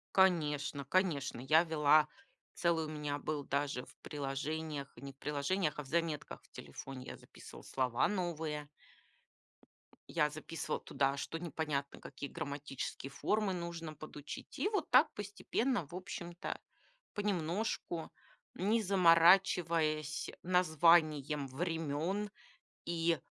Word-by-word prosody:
Конечно 150 -7 +3
конечно, 145 -7 +1
я 155 +5 +5
вела, 155 -1 +5 0.5
целый 170 -2 +1
у - - -6
меня 150 -1 -3
был 150 -1 -2
даже 140 -2 -1
в - - -16
приложениях, 145 +1 -3
не 140 +3 -8
в 135 - -26
приложениях, 150 +3 0
а 150 - -3
в - - -14
заметках 165 -1 -1
в - - -25
телефоне. 130 - -8
Я - - -7
записывала - - -13
слова 125 -3 +1
новые. 160 -6 -2 1.4
Я 150 -3 +2
записывала 155 +2 -4
туда, 135 0 0
что 165 +4 -4
непонятно, 150 -4 -2
какие 140 - -7
грамматические 140 -1 -5
формы 210 +6 0
нужно 170 -3 -5
подучить. 150 -1 -8
И 410 - +2
вот 405 -7 -1
так 260 +5 +7
постепенно, 205 - -1
в 175 - -9
общем-то, 175 -2 -5 0.5
понемножку, 180 -3 -1 0.4
не 215 +4 +2
заморачиваясь 170 -4 +4
названием 160 -5 +4
времен. 165 +6 -1 0.6
И 170 -1 +1
155 Hz, 115 wpm, -35 LUFS, 145-175 Hz, 1.4 s, так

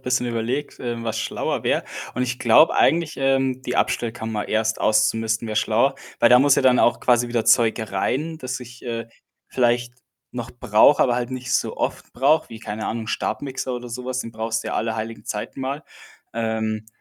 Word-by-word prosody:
bisschen 125 -1 0
überlegt, 120 +5 -3
ähm, 120 -2 -4
was 110 -1 -2
schlauer - - -2
wäre. - - +1 0.3
Und 125 - -1
ich 125 0 -2
glaube 120 +7 +5
eigentlich, 165 -1 +2
ähm, 135 -1 +1
die 125 - -3
Abstellkammer 110 -2 -1
erst 110 +1 0
auszumisten 110 +1 +1
wäre 110 - -3
schlauer, - - +2 0.2
weil - - +5
da 125 - +8
muss 140 +1 +5
ja - - +1
dann 130 -1 +5
auch 120 - +3
quasi 120 -1 +3
wieder 120 -2 -1
Zeug 115 -1 +4
rein, 150 +11 -1
das 130 -3 -4
ich, 125 0 -12
äh, 115 -2 -4 0.4
vielleicht 120 -1 +1 0.4
noch 120 -2 -5
brauche, 120 +2 +4
aber 125 - +2
halt 120 0 -2
nicht 125 -1 -4
so - - 0
oft - - -3
brauche, 145 +5 +2
wie, 115 - -9
keine 110 -1 -5
Ahnung, 115 0 -3
'n - - -12
Stabmixer 130 0 -3
oder 125 0 -6
so 125 +2 -6
was, 130 0 -2
den 115 - -7
brauchst 110 0 -2
du - - -4
ja - - -3
alle 115 0 -1
heiligen 110 +1 -5
Zeiten 105 +5 -5
mal. 135 +3 -3 0.5
Ähm, 110 -1 -2
120 Hz, 200 wpm, -22 LUFS, 110-130 Hz, 0.5 s, da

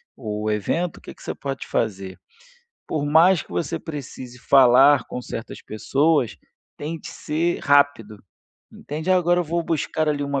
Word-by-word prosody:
o 105 -2 -4
evento, 160 - -1
o - - -15
que - - -10
que - - -21
você - - -4
pode 135 -1 -5
fazer? 95 -4 -3 0.7
Por 150 -2 -2
mais 165 +4 +5
que - - -25
você 155 - -2
precise 130 -5 -8
falar 135 0 +6
com 125 - -5
certas 115 -2 -7
pessoas, 135 - 0 0.4
tente 160 +2 -6
ser 165 +3 -2
rápido, 140 -8 +2 0.5
entende, 155 +5 -5
"Ah, 185 - +5
agora 175 0 +2
eu - - -2
vou 170 +2 -1
buscar 155 -1 -1
ali 145 -1 0
uma 140 -1 -1
145 Hz, 160 wpm, -22 LUFS, 120-160 Hz, 0.7 s, falar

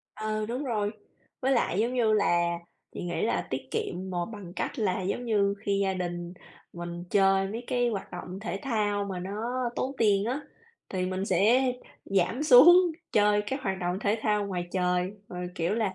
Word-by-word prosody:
Ờ, 215 0 -2
đúng 250 +5 -3
rồi. 210 -5 0 0.5
Với 265 +1 +2
lại 220 -6 +1
giống 240 +3 0
như 225 -3 +3
là 175 -4 +2 0.4
chị - - -5
nghĩ 175 - -2
là 225 - 0
tiết 130 0 -4
kiệm 185 +2 -3
mồ 175 -1 -2
bằng 205 -6 -9
cách - - -3
là 190 -3 0
giống 200 +6 -2
như 200 -3 +2
khi 200 -2 0
gia 190 -1 0
đình 175 -1 -4 0.4
mình 175 0 -6
chơi 195 -1 +4
với 235 +3 -5
cái 245 -1 +1
hoạt 205 -4 -4
động 185 +2 -7
thể 190 -1 -4
thao 210 -5 0
mà 190 -2 -4
nó 200 +4 -5 0.4
tốn 265 - -1
tiền 205 -2 +3
á, 260 +6 -1 0.5
thì 185 -1 -2
mình 185 +1 -2
sẽ 250 +6 +3 0.3
giảm 195 +8 +1
xuống 310 +5 +9 0.4
chơi 210 0 +4
các 265 +3 -3
hoạt 190 -2 -1
động 180 +1 -1
thể 215 +2 +1
thao 210 -1 +1
ngoài 180 -2 -3
trời. 180 0 +1 0.2
Rồi, 180 0 -5
kiểu 175 +4 0
là, 215 -4 0
200 Hz, 190 wpm, -28 LUFS, 180-225 Hz, 0.5 s, xuống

